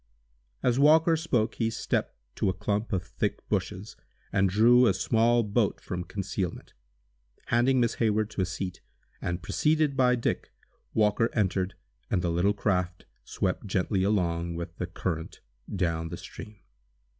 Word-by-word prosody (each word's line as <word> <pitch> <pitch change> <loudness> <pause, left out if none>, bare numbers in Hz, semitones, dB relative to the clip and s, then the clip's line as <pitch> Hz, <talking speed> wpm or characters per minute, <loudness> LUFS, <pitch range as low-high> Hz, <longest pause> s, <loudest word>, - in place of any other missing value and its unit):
As 125 +1 +2
Walker 160 +3 +6
spoke 125 -9 0
he 115 - +2
stepped 115 - -2 0.2
to - - +1
a - - 0
clump 105 +3 -2
of 95 -3 0
thick 95 +4 -3
bushes, 100 +1 -3 0.4
and 95 -1 +3
drew 120 +5 +6
a 100 - +3
small 115 +4 +3
boat 105 0 0
from 90 -1 -5
concealment. 95 -1 -4 0.8
Handing 125 +3 +3
Miss 120 -1 +2
Hayward 110 -1 +1
to - - -2
a - - +2
seat, 95 0 -5 0.4
and 85 +1 -3
preceded 150 -2 +1
by 125 -2 +4
Dick, 120 - -2 0.4
Walker 110 +1 +3
entered, 95 -3 0 0.3
and 90 - 0
the 85 - +1
little 90 +5 +2
craft 90 -3 -1 0.2
swept 95 +2 -2
gently 95 0 0
along 85 -4 0
with 85 0 -6
the 90 - -3
current, 85 -2 -4 0.3
down 80 -2 -1
the - - -6
stream. 105 -1 -10
100 Hz, 150 wpm, -28 LUFS, 90-115 Hz, 0.8 s, Walker